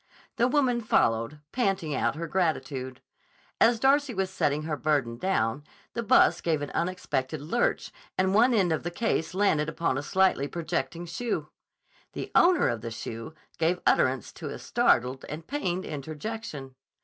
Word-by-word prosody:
The 240 - +4
woman 255 -3 +2
followed, 115 - +1
panting 195 - 0
out 135 - 0
her 165 +2 -4
gratitude. 150 -7 -2 0.6
As 230 -1 +4
Darcy 275 0 +3
was 190 -1 -1
setting 150 -5 0
her 155 -1 -2
burden 135 -5 0
down, 140 -8 0 0.3
the 235 - -2
bus 225 - +4
gave 155 -3 0
an 145 - -5
unexpected 160 -5 -2
lurch 170 - -1 0.3
and 190 0 +2
one 235 +4 +5
end 185 -5 +3
of 155 - -1
the 175 - -3
case 180 -2 -1
landed 165 -6 +2
upon 165 -5 -1
a - - -3
slightly 185 -4 +2
projecting 165 0 -3
shoe. 220 +8 -3 0.6
The - - -6
owner 355 0 +5
of 115 -2 -2
the 115 - -5
shoe 115 +5 -7 0.2
gave 170 +2 +2
utterance 130 -2 +2
to - - -7
a - - -6
startled 130 +2 +1
and 155 +2 -6
pained 185 -11 -2
interjection. 150 - -6
165 Hz, 160 wpm, -27 LUFS, 140-200 Hz, 0.6 s, one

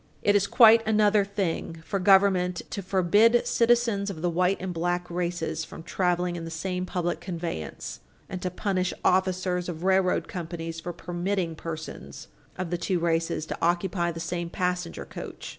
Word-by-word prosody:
It 205 - +4
is 200 -1 +3
quite 230 0 +7
another 210 -1 +4
thing 195 -5 -2
for 195 - -2
government 190 -2 +4
to 200 - -3
forbid 205 +6 +3
citizens 230 -4 +2
of 170 -4 -7
the 175 - +1
white 180 +3 +2
and 185 -1 -4
black 175 +1 -1
races 170 -2 -2
from 160 - -10
traveling 180 0 0
in 170 - -5
the 165 - -5
same 180 +3 -3
public 175 -1 -2
conveyance, 170 - -5 0.3
and 185 - -6
to 180 - -1
punish 185 0 -1
officers 185 -1 +1
of 165 -1 -6
railroad 190 -1 +2
companies 165 -2 -5
for 175 +2 -5
permitting 175 +1 -2
persons 160 0 -8 0.3
of 180 -2 -4
the 175 - -1
two 180 +2 0
races 165 -1 0
to - - -5
occupy 175 0 +1
the 165 - -7
same 170 +1 -3
passenger 180 -1 -2
coach. - - -8
180 Hz, 165 wpm, -27 LUFS, 170-190 Hz, 0.3 s, quite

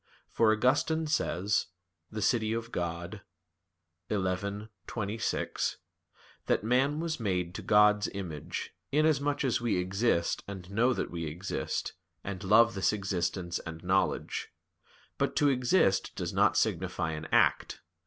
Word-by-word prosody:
For 110 -1 +4
Augustine 145 +8 +2
says 105 - 0 0.4
(De 110 -1 -3
Civ. 115 +1 0
Dei 85 0 -4 0.9
xi, 100 +1 -2 0.2
26), 110 0 -2 0.7
that - - +2
"man 130 +6 +2
was 165 -2 -2
made 90 -5 -1
to - - -6
God's 105 0 +4
image, 85 -7 -5 0.2
inasmuch 145 -1 +2
as 125 -3 +1
we 120 -5 +1
exist 95 0 0
and 95 -2 -8
know 115 +5 +3
that - - -2
we 85 -1 -4
exist, 85 +6 -3 0.3
and 100 0 -5
love 115 +4 +5
this 95 -2 +2
existence 95 -3 -2
and 80 0 -8
knowledge." 95 +2 0 0.7
But - - 0
to 145 - +4
exist 125 - +2
does - - -3
not - - +3
signify 80 - 0
an 75 0 -5
act. - - +2
105 Hz, 125 wpm, -30 LUFS, 90-120 Hz, 0.9 s, love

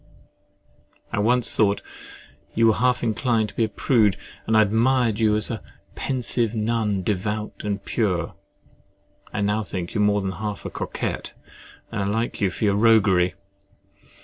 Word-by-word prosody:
I - - 0
once 120 +2 +1
thought 100 -2 +2 0.7
you 115 - +4
were 110 - +6
half 125 +3 +1
inclined 115 -1 +1
to - - -15
be 115 - +2
a - - -5
prude, 110 -4 +2 0.3
and 110 0 +3
I 110 - +7
admired 115 +1 +2
you 110 -2 +3
as 105 +2 -1
a 115 - -4 0.3
"pensive 120 -3 0
nun, 110 -3 0
devout 105 +2 -2
and 100 -1 -3
pure." 90 -7 -1 1.0
I 105 - -2
now 105 +2 +1
think 90 -3 -5
you 105 - 0
are - - +4
more 105 0 +2
than 95 -1 -2
half 105 +2 -5
a - - -4
coquet, - - -4 0.6
and 110 -3 -2
I - - 0
like 115 +4 -2
you 100 - +3
for 100 - -2
your 100 -1 +3
roguery. 100 -5 +4
110 Hz, 165 wpm, -23 LUFS, 100-115 Hz, 1.0 s, I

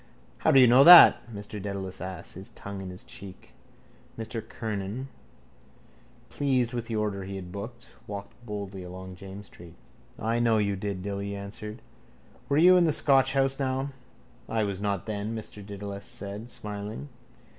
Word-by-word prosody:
—How - - +2
do 135 - +7
you 130 - +9
know 125 +3 +7
that? 170 -7 +10
Mr 105 -1 -7
Dedalus 95 -2 -5
asked, 95 0 -6
his 95 +2 -6
tongue 100 -1 -8
in 95 - -6
his 90 0 -8
cheek. 95 -1 -11 0.6
Mr 115 0 -4
Kernan, 110 +3 -5 1.2
pleased 130 -4 +1
with 120 -2 -3
the 115 - -3
order 105 -2 -1
he 95 +1 -6
had 90 -2 -7
booked, 110 +5 -8 0.2
walked 100 -1 -6
boldly 100 -3 -6
along 90 +1 -8
James's 100 +1 -9
street. 85 -2 -14 0.4
—I 115 +2 0
know 115 -2 +3
you 100 -2 +1
did, 95 -1 -4
Dilly 100 0 -4
answered. 105 +2 -8 0.7
Were 140 - +2
you 180 +3 +7
in 175 - +5
the 160 - +3
Scotch 135 -2 +4
house 135 0 +1
now? 135 +1 -1 0.6
—I 110 -1 +1
was 100 -2 -2
not, 100 -3 -1
then, 110 +1 -3
Mr 105 -2 -5
Dedalus 100 0 -7
said, 105 +4 -6
smiling. 105 +5 -6
105 Hz, 165 wpm, -28 LUFS, 100-120 Hz, 1.2 s, that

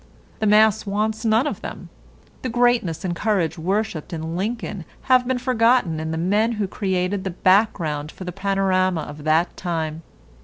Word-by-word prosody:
The 215 - +1
mass 215 0 +4
wants 215 +2 -1
none 225 +3 +3
of 295 - -3
them. - - -8 0.5
The 255 - -3
greatness 240 -8 +1
and 175 -2 -1
courage 175 -5 0
worshipped 190 -1 -2
in 165 0 -4
Lincoln 210 -1 -3 0.2
have 255 -1 +3
been 260 0 +1
forgotten 240 - +2
in 160 0 -4
the 160 - -2
men 205 +7 +1
who 210 -3 -2
created 190 0 -1
the 190 - -2
background 175 -5 +1
for - - -10
the 180 - -5
panorama 185 -2 +1
of 145 0 -9
that 160 +3 +2
time. 160 -3 -3
195 Hz, 165 wpm, -22 LUFS, 165-220 Hz, 0.5 s, mass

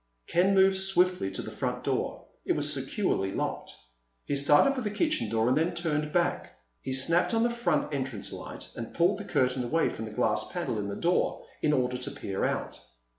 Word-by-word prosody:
Ken 190 +3 +3
moved 190 0 +5
swiftly 185 - +2
to 95 - -5
the - - -7
front - - -3
door. - - -2 0.2
It - - +1
was - - 0
securely 95 0 -1
locked. - - -3 0.5
He 145 - -1
started 145 - +4
for 260 - -3
the 215 - -1
kitchen 310 +9 0
door 115 0 +1
and 130 - +3
then 165 +3 +1
turned 150 -3 -1
back. 175 +1 -1 0.2
He 130 - -5
snapped 165 - +2
on 225 - +3
the 240 - +2
front 155 -11 0
entrance 130 -6 -3
light - - -8
and 115 - -7
pulled 180 +4 +3
the 205 - -6
curtain 125 -6 +1
away 160 +7 +1
from 110 - -6
the 110 - -7
glass 105 - 0
panel 110 - -2
in 100 - -3
the 100 - -4
door 175 +1 0 0.2
in 150 - +2
order 125 -3 +1
to 125 - -5
peer 95 -1 -4
out. - - -2
155 Hz, 205 wpm, -28 LUFS, 125-190 Hz, 0.5 s, moved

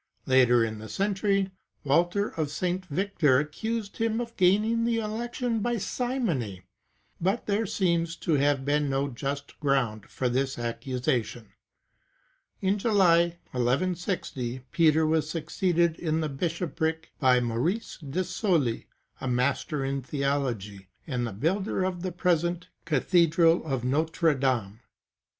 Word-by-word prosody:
Later 125 -3 +5
in 110 -1 -5
the 110 0 -9
century, 195 - 0 0.3
Walter 175 +8 +2
of 155 -3 -3
St. 180 +4 -2
Victor 155 -5 +2
accused 205 - -3
him 225 0 0
of 235 -1 -5
gaining 210 +5 +3
the 230 0 +1
election 230 +2 -2
by 240 +2 0
simony,^ 185 - -2 0.6
but 195 +7 0
there 210 +2 0
seems 170 -3 0
to 165 - -1
have 140 -1 +2
been 145 0 +1
no 135 +1 0
just 140 +3 -5
ground 130 -8 0
for 130 - -2
this 130 +2 0
accusation.^ 120 -2 -2 1.1
In 195 +2 +1
July, 175 -6 +3
1 125 -1 -1
1 140 +10 +2
60, 130 -9 -4
Peter 160 -1 +4
was 155 0 +1
succeeded 170 +1 0
in 160 -1 0
the 155 - -1
bishopric 160 +1 -2
by 130 -3 +5
Maurice 125 - -1
de 160 +4 -2
Sully, 170 - 0 0.3
a - - -4
Master 135 +3 0
in 135 0 -2
Theology, 125 -8 -2 0.2
and 125 -6 -2
the - - -5
builder 185 - -1
of 185 -2 -2
the 185 0 -3
present 175 0 0 0.2
Cathedral 165 +2 +3
of 135 -5 -2
Notre 160 +5 +2
Dame. 125 -7 -1
160 Hz, 135 wpm, -27 LUFS, 130-185 Hz, 1.1 s, Later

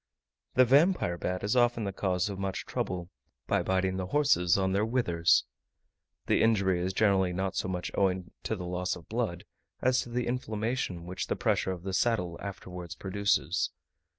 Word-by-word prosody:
The 130 0 +7
Vampire 140 - +4
bat 90 +1 -3
is 105 +4 +1
often 120 -2 +3
the 100 -1 -3
cause 95 -1 0
of 100 -2 -5
much 95 -1 -3
trouble, 90 -1 -3 0.3
by - - +1
biting 95 0 0
the 95 -1 -3
horses 130 - +3
on 95 -1 +1
their 100 +2 +2
withers. 110 -8 +3 0.8
The - - +2
injury 100 -5 +3
is 90 +2 -1
generally 95 -2 +2
not 95 +1 -2
so 95 - -1
much 90 -1 -3
owing 95 -3 0
to 110 - 0
the 90 -3 -6
loss 90 +1 -2
of 90 - -13
blood, 110 -7 -2 0.3
as 130 0 +3
to - - -8
the 120 0 -1
inflammation 110 -6 -2
which 90 +1 -4
the - - 0
pressure 95 - +1
of 90 -2 -6
the 95 0 -4
saddle 95 -6 0
afterwards 90 -4 -7
produces. 100 +1 0
95 Hz, 180 wpm, -29 LUFS, 90-110 Hz, 0.8 s, The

